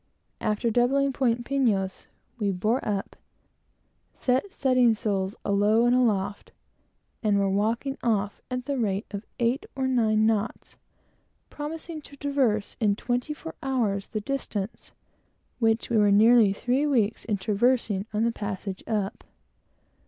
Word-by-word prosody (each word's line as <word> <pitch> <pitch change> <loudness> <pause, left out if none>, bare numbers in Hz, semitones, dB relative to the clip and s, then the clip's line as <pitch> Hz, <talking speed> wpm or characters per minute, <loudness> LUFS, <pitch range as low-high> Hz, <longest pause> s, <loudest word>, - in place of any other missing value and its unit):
After 220 +1 0
doubling 270 +4 +2
Point 240 -2 0
Pinos, 220 -9 0 0.3
we 205 -2 +1
bore 215 +7 0
up, 200 -2 -3 1.0
set 260 +10 0
studding 255 -6 +3
sails 200 -3 -2
alow 210 +3 +3
and 240 +1 +4
aloft, 205 -5 0 0.7
and 210 -2 +2
were 200 0 +2
walking 225 +8 0
off 210 -3 0
at 250 -1 -3
the 280 -1 -2
rate 205 -2 0
of 200 +1 -6
eight 240 +3 0
or 265 -1 -1
nine 220 -4 +2
knots, 220 0 -1 0.8
promising 315 +2 -6
to 285 -1 -14
traverse 265 -8 0
in 210 -4 +2
twenty 245 +6 -2
four 325 +1 -8
hours 225 -8 -1
the 215 - -4
distance 225 -5 -4 0.7
which 225 -1 +1
we 230 - +3
were 205 -1 +5
nearly 220 +1 +6
three 255 +8 0
weeks 230 -6 +1
in 210 -3 -1
traversing 215 -1 +1
on 215 +1 0
the 235 - +2
passage 200 -3 -5
up. 210 -3 -2
225 Hz, 135 wpm, -26 LUFS, 205-255 Hz, 1.0 s, nearly